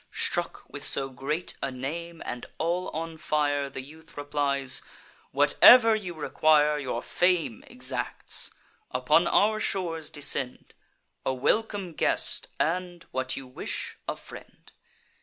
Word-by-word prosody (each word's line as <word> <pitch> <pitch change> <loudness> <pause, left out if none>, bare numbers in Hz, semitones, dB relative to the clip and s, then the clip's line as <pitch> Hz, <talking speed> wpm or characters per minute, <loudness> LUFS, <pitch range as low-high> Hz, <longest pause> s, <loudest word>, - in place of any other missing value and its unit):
Struck - - 0
with - - -8
so 135 -1 +3
great 140 +6 -3
a 135 - -1
name, 160 +6 -5
and 120 - -5
all 175 +3 -1
on 165 +1 -5
fire, 145 -2 0
The 135 - -6
youth 160 +3 -15
replies: 140 -2 0 0.5
"Whatever 225 - +7
you 185 -5 -5
require, 150 -1 +3
Your 125 -4 -3
fame 175 - +1
exacts. - - -3 0.4
Upon 150 +7 +3
our 215 +1 +3
shores 165 -7 -1
descend. 135 -3 -3 0.5
A 130 - 0
welcome 200 - 0
guest, - - +2
and, 175 +1 -1
what 130 0 -2
you 135 - -6
wish, 125 - -5
a - - -1
friend." - - -13
150 Hz, 125 wpm, -27 LUFS, 135-170 Hz, 0.5 s, Whatever